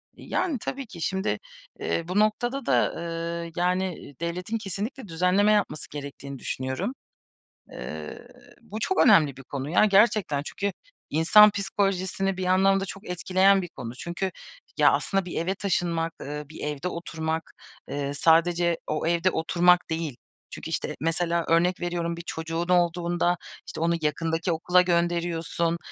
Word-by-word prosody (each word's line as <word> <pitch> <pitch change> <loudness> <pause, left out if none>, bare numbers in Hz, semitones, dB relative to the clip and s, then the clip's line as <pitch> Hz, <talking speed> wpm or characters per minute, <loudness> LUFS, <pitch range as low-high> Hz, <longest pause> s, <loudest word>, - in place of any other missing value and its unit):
Yani, 320 -7 -2
tabii 275 0 -4
ki. 170 -5 -10
Şimdi, 190 +4 -1 0.4
eee, 170 - -1
bu 185 +3 +1
noktada 240 +6 +1
da, - - +2 0.5
eee, 170 - -8
yani, 180 -4 -1
devletin 180 +6 -2
kesinlikle 215 +5 -5
düzenleme 180 +5 +3
yapması 205 -7 0
gerektiğini 140 -1 -7
düşünüyorum. 130 - -3 0.8
Eee, - - -7 0.3
bu 215 - -7
çok 380 - 0
önemli 165 - +5
bir 135 - -10
konu 135 +2 -5
ya, 180 - +5
gerçekten. 200 -7 +3
Çünkü 200 +6 -3 0.4
insan 210 +8 +7
psikolojisini 195 -1 -1
bir 185 - -3
anlamda 195 +1 +3
çok 195 +2 -8
etkileyen 190 +2 +3
bir 175 - -5
konu. 125 -6 -8
Çünkü, 175 +8 -3 0.5
ya, - - +6
aslında 195 -1 0
bir 175 - -3
eve 180 +3 -1
taşınmak, 170 -4 -1
eee, 150 +1 -5
bir 155 - -11
evde 150 +3 -3
oturmak, 160 -2 -4 0.4
eee, 140 0 -3
sadece 170 +2 +3
o 155 +1 -2
evde 170 +2 +2
oturmak 175 +1 +3
değil. 160 -5 -3 0.3
Çünkü, - - -7
işte, - - -3
mesela, 170 +2 0
örnek 175 +2 +3
veriyorum, 170 -1 -2
bir 170 - -7
çocuğun 165 +1 -3
olduğunda, 175 0 +2 0.3
işte, - - -7
onu 170 +1 +2
yakındaki 165 +3 0
okula 180 +3 +3
gönderiyorsun, 170 -1 0
175 Hz, 145 wpm, -26 LUFS, 165-195 Hz, 0.8 s, insan